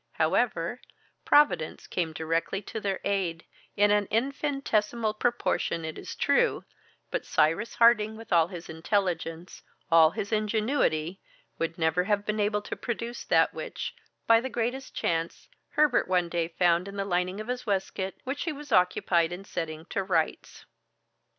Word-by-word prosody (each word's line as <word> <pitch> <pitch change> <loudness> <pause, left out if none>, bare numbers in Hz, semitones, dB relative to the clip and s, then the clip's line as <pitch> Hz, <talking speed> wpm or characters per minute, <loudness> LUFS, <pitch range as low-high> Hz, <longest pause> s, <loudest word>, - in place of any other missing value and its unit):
However, - - 0 0.4
Providence 290 - +3
came 170 -3 -2
directly 165 +4 -1
to 220 - -5
their 195 -2 -2
aid, 185 -5 -1 0.3
in 205 0 +5
an 205 -1 +2
infinitesimal 235 -4 0
proportion 215 -7 0
it 160 - -5
is - - -7
true, - - +2 0.5
but - - -1
Cyrus 165 +9 +1
Harding, 220 -2 +4
with 225 -3 -5
all 165 -1 +5
his 175 -2 -8
intelligence, 165 0 -2 0.3
all 165 -1 +7
his 200 +5 -5
ingenuity, 210 - 0 0.4
would 165 0 -2
never 160 +2 +1
have 205 0 0
been 215 0 -1
able 210 0 +1
to - - -5
produce 235 0 -4
that - - +3
which, - - -5 0.3
by 230 0 +6
the 260 - -4
greatest 245 +3 -3
chance, 165 0 -2 0.3
Herbert 300 -1 +3
one 180 -2 +1
day 170 -1 -1
found 175 +1 +2
in 200 - -8
the 200 -1 -2
lining 180 +1 -1
of 215 - -6
his 250 -1 -4
waistcoat, 195 -1 -2
which 275 +5 -3
he 330 - -1
was 290 -1 -9
occupied 180 -3 +3
in 180 +3 -7
setting 160 -3 -5
to 195 - 0
rights. 185 -4 -2
195 Hz, 155 wpm, -28 LUFS, 170-225 Hz, 0.5 s, all